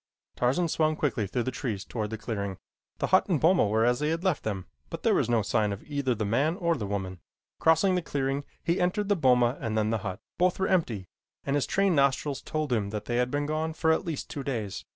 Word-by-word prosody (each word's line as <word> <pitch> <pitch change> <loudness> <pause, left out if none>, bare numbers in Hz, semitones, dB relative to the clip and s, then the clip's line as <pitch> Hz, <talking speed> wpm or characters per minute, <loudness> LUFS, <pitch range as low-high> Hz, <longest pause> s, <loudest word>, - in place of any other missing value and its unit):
Tarzan 135 +8 +1
swung 155 -1 +1
quickly 125 -9 -1
through 120 +5 -1
the 130 - -2
trees 115 -7 -4
toward 110 -3 -3
the 110 - -4
clearing. 100 -4 -4 0.4
The - - 0
hut 185 - +4
and 170 -6 +2
boma 170 - +4
were 110 +2 +2
as 120 +1 +2
he 150 +1 0
had 165 +2 -1
left 185 -5 +1
them, 95 -4 -3 0.2
but - - -7
there - - +4
was - - +1
no 115 -3 +2
sign 105 0 +1
of 100 - -6
either 140 -4 -1
the 110 - -2
man 135 +11 +1
or 170 -2 +1
the 105 -8 -4
woman. 95 -2 -3 0.4
Crossing 165 +4 +4
the 180 - +1
clearing, 140 -3 -2 0.2
he 170 +2 +1
entered 200 +3 0
the 205 - +4
boma 125 -4 +3
and 110 -1 -2
then 110 0 +1
the 115 - 0
hut. 95 +1 -5 0.2
Both 180 0 +3
were 190 - 0
empty, 120 - 0 0.4
and 140 - 0
his 145 - +1
trained 195 -3 +2
nostrils 140 0 +1
told 155 -4 -2
him 105 -4 0
that 105 0 -5
they 120 - -1
had 125 0 +2
been 145 +2 -1
gone 155 +2 -1
for 160 0 +2
at 160 - +1
least 165 -6 -4
two 145 - -5
days. 110 -8 -4
135 Hz, 245 wpm, -28 LUFS, 110-160 Hz, 0.4 s, hut